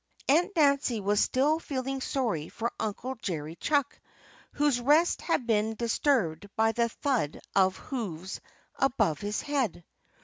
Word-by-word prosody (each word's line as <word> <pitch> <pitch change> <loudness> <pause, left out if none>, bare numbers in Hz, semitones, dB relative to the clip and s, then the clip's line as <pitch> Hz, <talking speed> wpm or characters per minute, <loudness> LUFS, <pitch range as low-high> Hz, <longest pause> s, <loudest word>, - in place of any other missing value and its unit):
Aunt 340 +8 +4
Nancy 280 -6 +3
was 205 +1 +1
still 295 +5 +2
feeling 270 -3 -3
sorry 230 - -1
for 235 +1 -3
Uncle 225 +5 -3
Jerry 160 -3 -4
Chuck, 285 - 0 0.5
whose 290 -4 +2
rest 300 +7 +3
had 295 -7 0
been 220 -1 +1
disturbed 220 - 0
by 225 0 +3
the 235 0 +1
thud 240 - -1 0.2
of 190 -1 +3
hoofs 190 - -5 0.4
above 220 - +2
his 205 +1 -3
head. 265 - -1
235 Hz, 135 wpm, -29 LUFS, 200-280 Hz, 0.5 s, Aunt